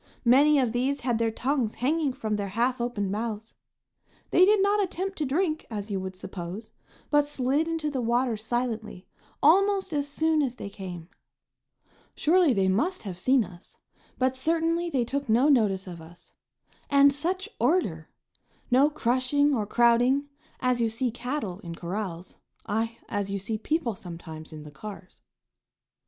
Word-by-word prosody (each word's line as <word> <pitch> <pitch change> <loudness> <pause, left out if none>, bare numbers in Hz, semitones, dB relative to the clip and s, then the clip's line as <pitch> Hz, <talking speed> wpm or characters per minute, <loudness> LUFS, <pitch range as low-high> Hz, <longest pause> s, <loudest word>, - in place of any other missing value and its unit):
Many 285 +5 +6
of 255 -4 +2
these 260 +4 0
had 240 -2 0
their 230 -1 +2
tongues 245 0 -1
hanging 295 +2 +1
from 220 -5 -3
their 200 -1 -2
half 240 +5 0
opened 210 -5 -2
mouths. 220 +1 -4 0.8
They 365 - +6
did 420 +1 +4
not 405 +1 +3
attempt 385 0 -3
to 300 - 0
drink, 315 +2 -1
as 210 -2 -5
you 195 - -1
would 190 0 -6
suppose, 185 +3 -7 0.4
but 295 -1 +4
slid 285 +2 0
into 325 -2 -2
the 265 -3 -2
water 240 0 +1
silently 225 -3 -3 0.4
almost 385 +3 +4
as 290 -1 0
soon 315 +2 +1
as 255 -4 -1
they 200 - -7
came. 180 -4 -8 1.1
Surely 340 -1 +4
they 195 -5 +2
must 310 - 0
have 190 -4 -5
seen 255 +7 +3
us, 180 -1 -14 0.4
but 260 0 +1
certainly 330 +4 0
they 260 -7 0
took 275 +1 -3
no 245 +7 +4
notice 210 -8 +3
of 175 -3 -8
us. 170 +2 -16 0.6
And 280 0 +6
such 360 +7 -2
order! 230 - +1 0.6
No 270 +4 +5
crushing 285 +1 +1
or 215 -5 -1
crowding, 240 +5 +3 0.3
as 250 -1 +1
you 230 - +2
see 235 +2 -1
cattle 245 -6 -4
in 170 -4 -8
corrals, 180 0 -5 0.3
aye, 225 +2 -2
as 205 -1 -2
you 200 - -2
see 215 +3 -4
people 300 -1 -1
sometimes 165 -4 -9
in 155 -1 -9
the 150 - -11
cars. 195 +2 -10
245 Hz, 160 wpm, -27 LUFS, 205-290 Hz, 1.1 s, Many